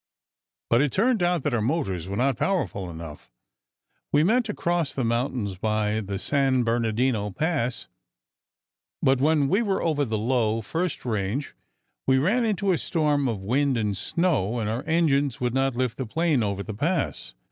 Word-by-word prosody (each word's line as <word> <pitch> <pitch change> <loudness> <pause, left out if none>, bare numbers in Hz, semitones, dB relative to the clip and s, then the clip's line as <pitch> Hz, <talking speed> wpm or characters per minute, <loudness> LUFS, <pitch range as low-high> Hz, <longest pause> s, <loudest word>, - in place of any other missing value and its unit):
"But 115 +2 +5
it 145 -2 +1
turned 230 +1 +2
out 175 -4 +1
that - - -1
our 115 - +1
motors 100 - -1
were 100 - -3
not 130 +2 +2
powerful 110 - -1
enough. 80 -6 -9 0.8
We 145 +1 +4
meant 230 +6 +2
to 210 - -2
cross 170 -3 -1
the 130 - -1
mountains 115 -4 -1
by 110 0 0
the 100 -2 -4
San 135 +2 +1
Bernardino 115 -1 0
Pass, 140 - -2 1.2
but 135 -1 +3
when 150 -1 +3
we 195 +9 +2
were 200 -4 0
over 155 -3 +1
the 110 -5 -1
low 115 -1 +1
first 165 - -3
range, 110 +4 -2 0.5
we 130 0 +4
ran 200 - +2
into 200 -3 +1
a 175 - +1
storm 150 -4 +1
of 105 -5 -3
wind 130 +5 +1
and 105 -3 0
snow, 120 - 0
and 110 -3 -1
our 115 +4 -2
engines 145 -5 +2
would 125 -1 -1
not 135 -1 +1
lift 125 -1 -1
the 130 - -3
plane 160 0 +1
over 100 -2 -2
the 110 - -6
Pass. 145 - -2
130 Hz, 175 wpm, -25 LUFS, 110-160 Hz, 1.2 s, But